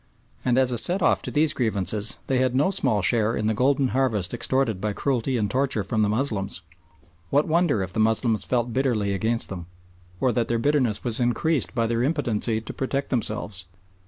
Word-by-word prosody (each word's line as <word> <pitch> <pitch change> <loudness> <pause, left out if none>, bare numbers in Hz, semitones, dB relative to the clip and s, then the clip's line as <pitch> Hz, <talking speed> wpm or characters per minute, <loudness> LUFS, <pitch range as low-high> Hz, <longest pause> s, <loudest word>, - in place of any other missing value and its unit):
And 125 -1 +1
as 130 -1 +3
a 120 - +4
set 180 +5 +3
off - - +3
to - - -5
these 150 0 +2
grievances 105 - 0
they 130 -1 0
had 130 -1 +1
no 145 +8 +2
small 120 - 0
share 115 +2 +2
in 110 - -2
the 110 - +1
golden 130 +3 +1
harvest 115 -8 0
extorted 120 -4 -1
by 105 -1 -1
cruelty 130 +1 -1
and 105 -2 0
torture 130 -1 -1
from 110 +1 -1
the 105 - +2
Moslems. 105 -6 -2 0.7
What 145 +2 +2
wonder 160 - +1
if 95 0 -6
the 110 - -3
Moslems 110 0 +2
felt 120 -2 -1
bitterly 115 -7 0
against 110 +4 0
them, 90 -3 -7 0.5
or 130 - +2
that 120 -2 -1
their 115 - 0
bitterness 125 -4 0
was 120 -3 -2
increased 125 +4 0
by 115 - +1
their 115 +1 -1
impotency 120 -6 0
to 110 - -8
protect 135 +1 -3
themselves. 105 -6 -2
120 Hz, 195 wpm, -24 LUFS, 105-135 Hz, 0.7 s, a